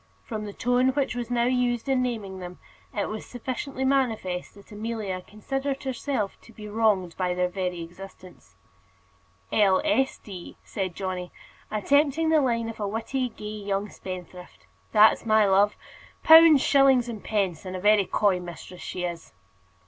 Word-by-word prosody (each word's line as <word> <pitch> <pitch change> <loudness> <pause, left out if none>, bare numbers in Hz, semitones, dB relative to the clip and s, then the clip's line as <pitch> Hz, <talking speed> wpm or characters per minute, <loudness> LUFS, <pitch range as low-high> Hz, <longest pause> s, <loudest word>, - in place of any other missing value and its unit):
From 215 -2 -5
the 205 - -6
tone 245 +3 +2
which 275 -3 0
was 240 -1 -4
now 240 -1 +1
used 245 -1 0
in 265 -2 +2
naming 215 -7 -3
them, 180 0 -8 0.3
it 205 - -2
was 215 0 -5
sufficiently 260 +2 -4
manifest 225 -11 0
that 200 +2 -17
Amelia 210 -3 -4
considered 270 +8 -4
herself 260 -5 -3
to - - -16
be 215 -1 -10
wronged 205 -5 +1
by 180 -1 0
their 180 0 +1
very 180 -2 -3
existence. 185 +1 -13 1.0
"L. 195 -3 +4
S. 270 -3 +1
D.," 185 -4 -10
said 185 -4 -4
Johnny, 185 -2 -4 0.4
attempting 285 +8 +2
the 315 -1 +4
line 230 -3 0
of 225 - -7
a 205 - -1
witty, 245 +5 -2
gay 215 - -11
young 205 -1 -3
spendthrift. 180 -1 -9 0.3
"That's 215 0 +5
my 220 -1 +4
love 200 +1 +3 0.5
pounds, 320 -3 +8
shillings, 270 -3 +4
and 225 -4 -7
pence; 195 -6 -1
and 185 -1 -6
a - - -4
very 205 +1 +4
coy 200 -3 +2
mistress 175 +1 -10
she 180 - -5
is." 170 - -5
215 Hz, 160 wpm, -26 LUFS, 190-250 Hz, 1.0 s, pounds